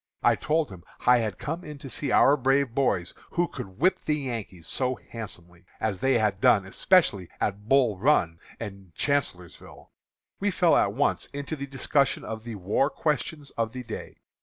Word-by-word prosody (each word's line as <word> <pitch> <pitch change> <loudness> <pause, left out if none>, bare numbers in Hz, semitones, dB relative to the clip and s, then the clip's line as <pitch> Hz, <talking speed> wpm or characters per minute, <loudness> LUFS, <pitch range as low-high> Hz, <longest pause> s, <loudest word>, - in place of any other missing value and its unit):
I - - +5
told 155 -5 0
him 90 -3 -11 0.2
I 125 0 +6
had 110 -4 -2
come 165 +5 -4
in 150 -1 -8
to 140 - -9
see 140 +2 -2
our 140 - +6
brave 135 -2 +2
boys, 100 -10 0 0.2
who 175 0 +2
could 95 - -8
whip 185 +9 +3
the 150 - 0
Yankees 115 - -5
so 130 +5 -1
handsomely, 90 -8 -9 0.2
as 100 -4 -1
they 135 +2 +3
had 105 -3 0
done 100 -3 +5
especially 100 - +2
at 105 +2 -2
Bull 125 -8 +3
Run 95 - +2 0.2
and 100 -5 -8
Chancellorsville. 110 - -3 0.5
We 205 - +1
fell 175 -2 +3
at 100 - +3
once 140 +6 +1
to 145 +2 -5
the 140 -1 -6
discussion 135 +1 +1
of 110 0 -6
the 115 -2 -5
war 105 +8 +1
questions 150 0 -2
of 115 0 -2
the 130 -1 -6
day. 110 -2 -7
125 Hz, 180 wpm, -27 LUFS, 100-140 Hz, 0.5 s, I